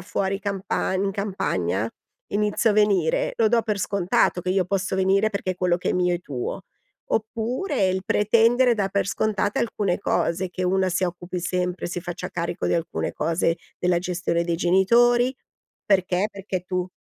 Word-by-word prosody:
fuori 195 +2 -2
campagn 195 -1 -1
in 195 - -1
campagna, 115 - -1 0.4
inizio 210 +2 +2
a - - +3
venire; 200 -6 +2
lo 225 - +3
do 230 +1 +3
per 210 -2 -2
scontato 185 -2 +1
che 180 - -2
io 190 -1 +2
posso 190 0 -1
venire 195 +3 +3
perché 190 -2 -2
quello 180 -1 +1
che 180 - -2
è - - +1
mio 180 -1 +1
è - - -11
tuo. 130 -7 -5 0.5
Oppure 225 - 0
il 190 +1 -1
pretendere 230 +4 +4
dar 200 -3 0
per 200 0 0
scontate 205 -1 0
alcune 205 -5 0
cose: 185 +2 0
che 185 +1 -4
una 190 +1 +2
si 185 +1 0
occupi 175 0 -4
sempre, 180 0 -2
si 175 0 -4
faccia 175 +1 -5
carico 170 +1 -3
di - - +1
alcune 170 0 -2
cose 165 +1 0 0.2
della 180 -1 +2
gestione 175 -1 -1
dei 170 -1 -1
genitori, 240 +8 +4 0.5
perché? 190 0 +2
Perché 195 -2 -4
tu 180 0 -3
190 Hz, 170 wpm, -24 LUFS, 180-205 Hz, 0.5 s, pretendere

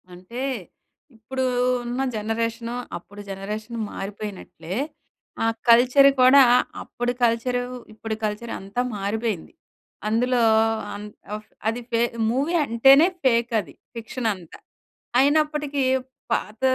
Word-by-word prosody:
అంటే, 185 +8 -8 0.8
ఇప్పుడు 260 +4 -3 0.4
ఉన్న 245 +2 -2 0.2
జనరేషన్ 230 +2 -2 0.3
అప్పుడు 205 +4 -12
జనరేషన్ 210 +4 -5 0.2
మారిపోయినట్లే, 195 -4 -6 0.7
ఆ - - +3 0.2
కల్చర్ 255 +4 +7
కూడా, 265 +2 +8 0.4
అప్పుడు 245 0 -2
కల్చరూ, 240 +2 +1 0.3
ఇప్పుడు 220 0 -4
కల్చర్ 215 +2 -4
అంతా 200 +5 -3 0.2
మారిపోయింది. 205 -2 -3 0.5
అందులో 245 +3 +2 0.5
అం 205 - -6 0.4
ఫ్ 215 - -30 0.2
అది 230 +2 -1
ఫే 230 - +2 0.3
మూవీ 275 +8 0
అంటేనే 270 +7 +6 0.2
ఫేక్ 235 -2 +2
అది. 160 -9 -7 0.2
ఫిక్షన్ 230 +1 -4
అంతా. 180 -4 -12 0.6
అయినప్పటికీ 295 0 +2 0.5
పాత 215 +2 -3
230 Hz, 105 wpm, -24 LUFS, 210-255 Hz, 0.8 s, కూడా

